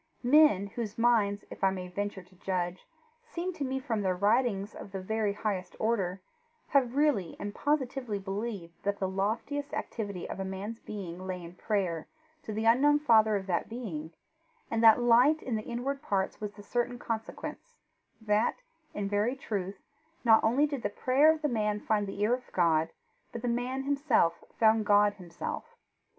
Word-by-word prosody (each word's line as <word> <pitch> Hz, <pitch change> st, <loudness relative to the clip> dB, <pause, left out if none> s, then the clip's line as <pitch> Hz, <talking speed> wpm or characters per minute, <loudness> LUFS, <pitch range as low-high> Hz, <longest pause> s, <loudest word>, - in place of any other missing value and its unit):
Men, 260 Hz, -6 st, +5 dB
whose 210 Hz, +1 st, -5 dB
minds, 225 Hz, -4 st, +2 dB
if -, -, -9 dB
I 195 Hz, -, +6 dB
may 185 Hz, -1 st, -4 dB
venture 200 Hz, +1 st, -4 dB
to 185 Hz, +1 st, -23 dB
judge, 180 Hz, -1 st, -3 dB, 0.4 s
seem 370 Hz, -6 st, -4 dB
to 300 Hz, -, -4 dB
me, 265 Hz, 0 st, -1 dB
from 235 Hz, -6 st, -2 dB
their 185 Hz, -2 st, +1 dB
writings, 205 Hz, 0 st, +1 dB
of 195 Hz, -, -10 dB
the 195 Hz, -, -3 dB
very 210 Hz, +2 st, -1 dB
highest 195 Hz, -3 st, -3 dB
order, 195 Hz, -5 st, -1 dB, 0.5 s
have 260 Hz, -3 st, +2 dB
really 280 Hz, -, +2 dB
and 205 Hz, 0 st, -4 dB
positively 265 Hz, -6 st, -1 dB
believed 195 Hz, -2 st, -5 dB
that 200 Hz, 0 st, -1 dB
the 190 Hz, -, -1 dB
loftiest 225 Hz, +10 st, -2 dB
activity 200 Hz, -5 st, -4 dB
of -, -, -6 dB
a -, -, -1 dB
man's 195 Hz, +4 st, -5 dB
being 185 Hz, -3 st, -7 dB
lay 180 Hz, -1 st, -4 dB
in 170 Hz, +1 st, -9 dB
prayer 180 Hz, -5 st, -1 dB, 0.3 s
to 250 Hz, -, -7 dB
the 220 Hz, +1 st, -2 dB
unknown 275 Hz, +6 st, +5 dB
Father 220 Hz, -7 st, +4 dB
of 195 Hz, -1 st, -2 dB
that 175 Hz, -3 st, -1 dB
being, 180 Hz, -10 st, -5 dB, 0.6 s
and 225 Hz, 0 st, 0 dB
that 225 Hz, +1 st, +8 dB
light 245 Hz, +6 st, +5 dB
in 245 Hz, -, -2 dB
the 215 Hz, -, -1 dB
inward 260 Hz, +5 st, -3 dB
parts 195 Hz, 0 st, -1 dB
was 210 Hz, -1 st, -4 dB
the 205 Hz, -, -12 dB
certain 245 Hz, +3 st, -1 dB
consequence 240 Hz, -, -6 dB, 0.4 s
that, 215 Hz, 0 st, +1 dB, 0.4 s
in 200 Hz, -1 st, -2 dB
very 205 Hz, +5 st, +1 dB
truth, 200 Hz, -7 st, -4 dB, 0.5 s
not 225 Hz, -1 st, +6 dB
only 255 Hz, +7 st, +4 dB
did 285 Hz, -4 st, -3 dB
the 205 Hz, -, -1 dB
prayer 265 Hz, +8 st, +4 dB
of 315 Hz, -1 st, -4 dB
the -, -, +3 dB
man 210 Hz, -5 st, 0 dB
find 210 Hz, -1 st, 0 dB
the 195 Hz, +1 st, -6 dB
ear 215 Hz, +3 st, +3 dB
of 250 Hz, 0 st, -4 dB
God, 165 Hz, -2 st, +3 dB, 0.4 s
but 235 Hz, -, -7 dB
the -, -, 0 dB
man 245 Hz, +3 st, -1 dB
himself 275 Hz, -, +2 dB, 0.2 s
found 220 Hz, -1 st, +5 dB
God 205 Hz, 0 st, +4 dB
Himself. 175 Hz, -4 st, -7 dB
215 Hz, 180 wpm, -30 LUFS, 195-245 Hz, 0.6 s, that